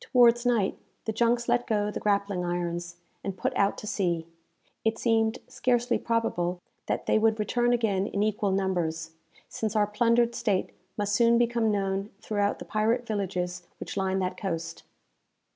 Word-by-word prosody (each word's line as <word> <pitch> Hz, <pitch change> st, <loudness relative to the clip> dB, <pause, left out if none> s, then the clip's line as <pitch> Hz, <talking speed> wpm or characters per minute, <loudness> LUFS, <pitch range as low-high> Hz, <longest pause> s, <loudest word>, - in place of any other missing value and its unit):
Towards 240 Hz, -1 st, +6 dB
night, 225 Hz, -6 st, +1 dB, 0.3 s
the 220 Hz, -, 0 dB
junks 235 Hz, +2 st, +1 dB
let 245 Hz, -, +2 dB
go 210 Hz, -2 st, +1 dB
the -, -, -4 dB
grappling 200 Hz, -3 st, 0 dB
irons, 175 Hz, 0 st, -3 dB, 0.3 s
and 195 Hz, -1 st, -4 dB
put -, -, -1 dB
out 200 Hz, 0 st, +2 dB
to -, -, -7 dB
sea. 175 Hz, -6 st, -1 dB, 0.6 s
It 225 Hz, 0 st, +1 dB
seemed 225 Hz, -1 st, +2 dB
scarcely 245 Hz, -1 st, +1 dB
probable 185 Hz, -6 st, 0 dB, 0.3 s
that -, -, -1 dB
they -, -, +3 dB
would 220 Hz, 0 st, +3 dB
return 240 Hz, +3 st, +1 dB
again 210 Hz, -5 st, +1 dB
in 205 Hz, -1 st, -1 dB
equal 210 Hz, -1 st, 0 dB
numbers, 175 Hz, -4 st, -1 dB, 0.4 s
since 220 Hz, -1 st, -3 dB
our 210 Hz, -1 st, +4 dB
plundered 230 Hz, +3 st, +2 dB
state 205 Hz, -5 st, 0 dB, 0.3 s
must 205 Hz, -1 st, 0 dB
soon 235 Hz, +2 st, +5 dB
become 235 Hz, -1 st, +2 dB
known 195 Hz, 0 st, -1 dB
throughout 205 Hz, -2 st, 0 dB
the -, -, -9 dB
pirate 225 Hz, +3 st, +1 dB
villages 180 Hz, -4 st, -3 dB
which -, -, -6 dB
line 190 Hz, -1 st, 0 dB
that 185 Hz, -1 st, -1 dB
coast. 165 Hz, -4 st, -4 dB
205 Hz, 160 wpm, -28 LUFS, 190-230 Hz, 0.6 s, Towards